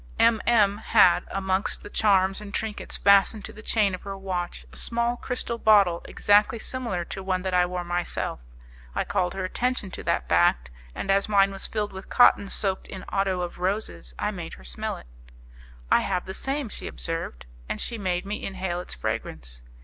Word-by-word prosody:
M 230 -2 +4
M 210 -3 +4
had, 200 -6 +5
amongst 190 0 -1
the - - -8
charms 195 -2 +3
and 205 -1 -8
trinkets 215 +1 -3
fastened 200 +1 +4
to - - -8
the 215 - -11
chain 210 -3 +2
of 185 - -5
her 195 -1 -6
watch, 180 - -4
a - - -12
small 235 - 0
crystal 240 -2 -3
bottle 200 -6 +5
exactly 205 +2 +3
similar 225 -7 -3
to 195 - -6
one 185 -1 -1
that 190 -1 -2
I 180 0 +4
wore 180 0 -3
myself. 175 - -2 0.6
I - - +1
called 180 -1 -1
her 190 -1 -2
attention 240 0 -1
to - - -7
that - - 0
fact, 60 0 +3 0.2
and 195 - -1
as 200 +2 +2
mine 195 -1 +4
was 195 - -3
filled 210 -2 -2
with 190 0 -9
cotton 205 -5 +5
soaked 195 -2 -2
in 190 - -8
otto 195 -2 0
of 175 0 -5
roses 180 - -2
I - - -1
made - - -7
her 65 - -12
smell - - -4
it. - - -13 0.9
"I - - +6
have 180 -2 -1
the 190 - -6
same," 270 +4 -2
she - - -7
observed. 165 - -4 0.2
And - - -2
she 230 -2 -3
made 180 -2 -1
me 205 +1 -4
inhale 185 -2 -3
its 180 - -6
fragrance. - - -4
195 Hz, 195 wpm, -26 LUFS, 180-210 Hz, 0.9 s, I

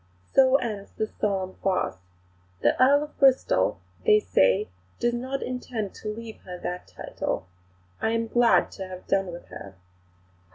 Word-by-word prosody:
So 260 0 +6
ends 215 -7 -1
the 220 - +1
solemn 195 -3 -2
farce. 190 - 0 0.6
The - - +4
Earl 285 +3 +6
of 300 - -11
Bristol, 270 -2 +3 0.2
they 425 -1 +6
say, 95 - +3 0.3
does 240 0 +1
not 260 +3 -3
intend 245 -5 -4
to - - -9
leave 225 +1 -7
her 180 -1 -9
that 180 0 -5
title.... - - -4 0.6
I - - +2
am 230 0 0
glad 240 +1 +4
to 190 -2 -7
have 185 0 -9
done 195 -1 +1
with 170 - -10
her." 95 -1 -10
220 Hz, 155 wpm, -26 LUFS, 190-255 Hz, 0.6 s, So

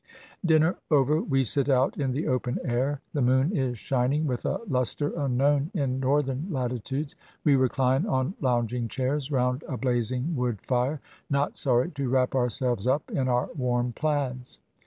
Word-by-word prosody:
Dinner 160 0 +3
over, 150 +1 +3
we 135 -2 +1
sit 140 +3 +1
out 130 0 +3
in 135 -3 -1
the 140 +5 -2
open 125 -1 0
air. 135 +3 -1
The 145 - 0
moon 130 +9 +3
is 130 -4 -1
shining 135 +6 0
with 125 -4 -2
a - - 0
luster 130 +1 -1
unknown 140 0 +1
in 135 -5 0
Northern 135 +2 0
latitudes. 135 - -3 0.3
We 145 - +4
recUne 130 0 +2
on 130 +5 0
lounging 120 -2 0
chairs 135 +4 -2
round 125 0 +1
a 130 - -3
blazing 125 +4 -1
wood 125 -4 -1
lire, 130 +4 +1 0.3
not 140 +1 0
sorry 125 +4 +1
to 140 -3 -3
wrap 130 0 +2
ourselves 125 -3 0
up 140 +4 0
in 130 -2 0
our 125 -1 +1
warm 125 -4 -1
plaids. 135 -5 -2
130 Hz, 160 wpm, -27 LUFS, 125-145 Hz, 0.3 s, We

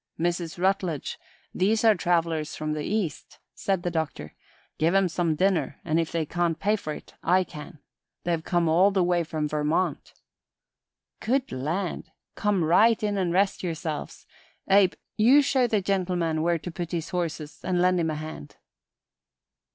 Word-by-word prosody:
"Mrs. 170 0 -1
Rutledge, 185 -4 -1 0.3
these 215 +5 +1
are 220 -1 +7
travelers 165 -4 0
from 155 0 -3
the 150 - -3
East," 205 -5 -3 0.2
said 190 -3 -1
the 175 - -1
Doctor. 155 - -3 0.5
"Give 165 +4 +2
'em 195 -1 +4
some 170 -2 0
dinner, 160 -5 0
and 160 0 +1
if 165 -1 -1
they 165 -2 -1
can't 170 0 -1
pay 210 +2 +2
for 155 -7 -5
it, - - -9
I 185 +2 +3
can. 155 0 -10 0.5
They've 170 -2 -1
come 175 -1 +1
all 175 +5 +5
the 195 -2 +1
way 175 -1 +2
from 155 -1 -2
Vermont." 150 +2 -1 1.1
"Good 265 +3 0
land! 165 +8 -3 0.2
Come 205 -4 +1
right 215 +8 +4
in 205 -1 0
an' 180 -2 0
rest 195 +3 +1
yerselves. 160 -3 -5 0.4
Abe, 195 -1 +5 0.2
you 255 +7 +6
show 260 -2 +2
the 215 -3 +1
gentleman 180 -4 0
where 170 +1 +2
to 175 +2 -7
put 170 0 -5
his 165 -1 -2
horses 165 -4 -4
an' 180 -1 0
lend 180 0 +3
him 165 -1 0
a 155 - -2
hand." 155 - -8
175 Hz, 165 wpm, -26 LUFS, 160-190 Hz, 1.1 s, are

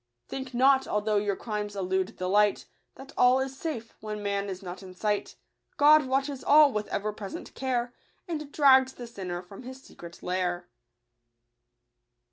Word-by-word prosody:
Think 265 -2 -6
not, 265 +2 +4
although 210 0 0
your 205 -1 0
crimes 210 -2 -4
elude 190 +1 -2
the 185 - -3
light, 205 +2 +2 0.3
That 270 +1 -12
all 250 +1 +5
is 265 0 -3
safe 270 -6 -5
when 210 -1 -6
man 200 0 -1
is 190 0 -6
not 180 +1 -7
in 185 -1 -11
sight; 210 +1 -2 0.4
God 300 -1 +6
watches 270 +1 -1
all 295 -1 +6
with 210 0 -2
ever 210 +1 -2
present 205 -2 -8
care, 245 -2 -2 0.3
And 305 -4 -5
drags 265 -3 +5
the 245 - -9
sinner 185 -6 -6
from 195 +4 -12
his 260 +1 -9
secret 170 0 -13
lair. 180 -1 -2
215 Hz, 160 wpm, -28 LUFS, 195-265 Hz, 0.4 s, God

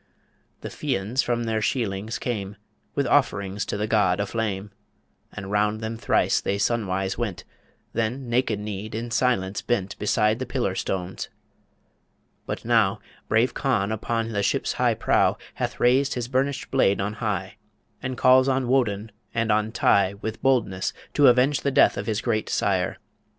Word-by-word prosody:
The - - -5
Fians 105 +8 -1
from 120 -1 -1
their 110 -1 -1
sheilings 110 -1 -1
came, 105 -5 -3 0.4
With 140 - +1
offerings 105 -7 +1
to - - -2
the 105 - -1
god 105 -4 +2
a 100 - +1
flame, 105 -2 -3 0.6
And 95 +1 -7
round 105 +1 +1
them 110 0 -4
thrice 115 - +2
they 100 - -1
sun 110 +1 0
wise 95 +3 -2
went; 100 -7 -3 0.5
Then 120 +4 -2
naked 120 -3 +1
kneed 105 +1 -5
in 115 +1 -4
silence 105 -4 +1
bent 100 -6 -1
Beside 105 +1 +2
the 130 - -4
pillar 125 -7 -1
stones... 95 -1 -3 1.2
But - - -4
now 115 -5 +3 0.3
Brave 115 +3 +2
Conn 110 -7 0
upon 115 +1 -2
the 100 -2 0
ship's - - 0
high - - +2
prow - - +2 0.2
Hath - - -4
raised 130 +3 +3
his 120 -2 -3
burnished 135 +2 -1
blade 100 -7 +3
on 105 +2 -1
high, 100 -3 -2 0.4
And 130 -1 -4
calls 130 +1 +5
on 130 -1 +1
Woden 110 -5 +1 0.2
and 115 -1 +1
on 105 +1 +1
Tigh 100 -3 +3
With 110 +1 -5
boldness, 110 -8 +1 0.2
to 145 -2 +5
avenge 130 +3 +4
the 140 - +1
death 135 - +4
Of - - -4
his 110 -1 0
great 110 -3 -1
sire - - 0
110 Hz, 165 wpm, -25 LUFS, 100-125 Hz, 1.2 s, calls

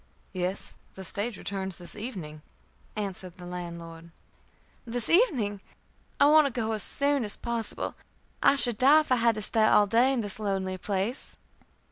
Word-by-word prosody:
"Yes; 185 +1 -3 0.2
the 190 - -8
stage 205 +4 0
returns 190 -2 -4
this 175 -1 -3
evening," 185 -10 -7 0.5
answered 190 -4 -5
the 180 - -10
landlord. 170 -2 -8 0.7
"This 235 -1 -3
evening! 255 - +2 0.6
I - - +6
want 305 0 +6
to - - -2
go 225 -2 -2
as 215 -1 -2
soon 280 +2 +1
as 210 - 0
possible. 235 -1 -3 0.5
I - - +5
should 240 -5 +2
die 290 +4 +6
if 305 - -10
I 255 - +5
had 230 -1 +3
to 215 - -4
stay 220 +1 +1
all 210 -1 +5
day 235 +6 +3
in 260 -3 0
this 205 -1 0
lonely 190 -3 -2
place." 200 +7 -3
210 Hz, 165 wpm, -27 LUFS, 190-245 Hz, 0.7 s, I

